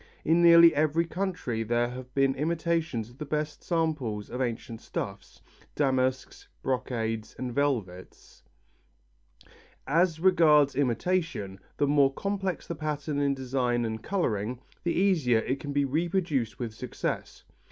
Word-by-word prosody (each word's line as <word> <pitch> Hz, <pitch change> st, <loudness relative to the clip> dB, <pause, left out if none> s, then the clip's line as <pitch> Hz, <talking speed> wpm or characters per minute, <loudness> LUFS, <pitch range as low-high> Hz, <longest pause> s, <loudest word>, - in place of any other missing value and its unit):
In 165 Hz, +2 st, +4 dB
nearly 170 Hz, -1 st, +8 dB
every 155 Hz, +3 st, +2 dB
country 170 Hz, -, -3 dB
there 120 Hz, +2 st, +1 dB
have 125 Hz, 0 st, -9 dB
been 135 Hz, -1 st, +3 dB
imitators 160 Hz, -6 st, -1 dB
of 125 Hz, -, -20 dB
the -, -, -3 dB
best 150 Hz, 0 st, -3 dB
samples 150 Hz, -, -1 dB
of 125 Hz, +2 st, -3 dB
ancient 115 Hz, -2 st, -4 dB
stuffs, -, -, -6 dB, 0.3 s
damasks, 135 Hz, -, 0 dB, 0.2 s
brocades 115 Hz, -4 st, -2 dB
and 125 Hz, -2 st, -4 dB
velvets. 115 Hz, -11 st, -3 dB, 1.4 s
As 165 Hz, +3 st, +2 dB
regards 155 Hz, -6 st, +5 dB
imitation, 135 Hz, -, -1 dB, 0.2 s
the 145 Hz, -, +2 dB
more 140 Hz, -1 st, +4 dB
complex 195 Hz, +3 st, -3 dB
the -, -, -4 dB
pattern 150 Hz, -2 st, -3 dB
in 140 Hz, -1 st, +1 dB
design 125 Hz, -2 st, 0 dB
and 110 Hz, -1 st, -4 dB
colouring, 120 Hz, -, -1 dB, 0.2 s
the 170 Hz, -, 0 dB
easier 170 Hz, -, +3 dB
it 130 Hz, +4 st, -2 dB
can 145 Hz, -, -5 dB
be 140 Hz, 0 st, +1 dB
reproduced 150 Hz, -, -1 dB
with 115 Hz, -3 st, -4 dB
success. 125 Hz, +2 st, -5 dB
140 Hz, 130 wpm, -28 LUFS, 120-165 Hz, 1.4 s, nearly